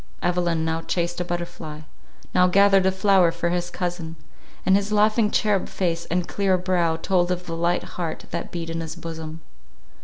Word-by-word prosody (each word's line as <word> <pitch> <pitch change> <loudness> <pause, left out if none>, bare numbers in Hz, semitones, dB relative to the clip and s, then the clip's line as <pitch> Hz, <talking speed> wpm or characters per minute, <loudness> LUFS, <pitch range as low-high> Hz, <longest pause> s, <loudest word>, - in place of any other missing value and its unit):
Evelyn 175 -2 +1
now 160 0 -1
chased 175 +1 -2
a - - +1
butterfly—now 175 0 -3
gathered 195 0 +5
a - - +4
flower 190 -2 +4
for 170 - -1
his 175 0 -1
cousin; 175 -3 -4 0.5
and 190 - +5
his 200 +1 0
laughing 215 +1 +3
cherub 210 -3 +1
face 170 -3 -1
and 180 +1 -1
clear 195 -2 +1
brow 175 -3 +1
told 175 +1 +1
of 180 0 -2
the 165 - -4
light 170 +1 +1
heart 165 -3 -5
that - - -4
beat 165 -1 -4
in 165 0 -3
his 160 0 -6
bosom. 160 -1 -7
175 Hz, 175 wpm, -24 LUFS, 165-185 Hz, 0.5 s, gathered